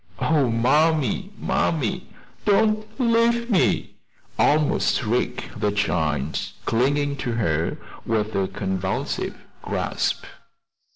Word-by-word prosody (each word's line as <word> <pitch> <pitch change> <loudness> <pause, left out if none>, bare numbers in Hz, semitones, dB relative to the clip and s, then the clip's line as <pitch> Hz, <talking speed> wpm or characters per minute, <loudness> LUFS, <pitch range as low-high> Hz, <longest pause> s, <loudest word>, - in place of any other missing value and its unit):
"Oh, 150 -5 +2
mammy, 150 - +2
mammy, 145 -10 -1 0.4
don't 215 +1 +2
leave 235 0 +2
me!" 190 - +1 0.4
almost 150 0 +3
shrieked 120 -2 -2
the 105 -1 +1
child, 80 -8 0 0.3
clinging 140 +4 +1
to 120 -3 -2
her 85 -8 0 0.3
with 110 -1 -1
a 95 -1 +1
convulsive 95 0 -3 0.2
grasp. - - -1
125 Hz, 95 wpm, -23 LUFS, 105-165 Hz, 0.4 s, almost